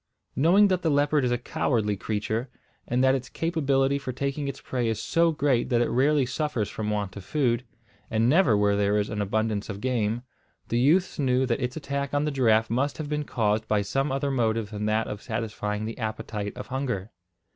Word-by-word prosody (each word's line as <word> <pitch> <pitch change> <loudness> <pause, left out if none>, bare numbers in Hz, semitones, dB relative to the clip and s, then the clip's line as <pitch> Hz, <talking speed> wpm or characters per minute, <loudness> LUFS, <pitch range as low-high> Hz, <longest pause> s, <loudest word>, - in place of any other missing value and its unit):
Knowing 180 +9 +5
that 185 -2 +1
the 165 - +1
leopard 145 0 +2
is 125 - +1
a 120 - +2
cowardly 115 -3 0
creature, 110 +4 -2 0.4
and 125 +2 +1
that 130 0 +5
its 130 -1 -3
capability 140 -4 +1
for 135 -2 -4
taking 140 +3 -3
its 140 - -5
prey 125 -2 -2
is 110 -2 -1
so 165 +8 +2
great 140 -5 +1
that 120 - +3
it 120 - +1
rarely 140 +2 +3
suffers 125 -4 -1
from 105 -1 -4
want 105 -2 -2
of 100 - -8
food, 125 -2 0 0.5
and 110 +1 +2
never 130 - +4
where 100 0 +3
there 100 +1 +2
is 105 0 -1
an 105 -1 -2
abundance 110 +1 -1
of 100 -1 -5
game, 120 -1 -1 0.5
the 115 - +1
youths 160 +9 +3
knew 130 -1 +2
that 120 +1 -1
its 125 +4 -2
attack 140 -1 -3
on 145 +1 +2
the 150 - 0
giraffe 115 -5 +3
must 130 +6 -1
have 155 -2 -5
been 150 -1 -1
caused 110 -3 0
by 105 -1 +2
some 135 +7 -1
other 140 +1 -1
motive 115 -4 0
than 105 0 -3
that 110 +1 +1
of 105 -1 -6
satisfying 110 -2 -3
the 115 +2 -6
appetite 110 -1 -4
of 125 - -6
hunger. 125 -7 -3
125 Hz, 210 wpm, -26 LUFS, 110-140 Hz, 0.5 s, Knowing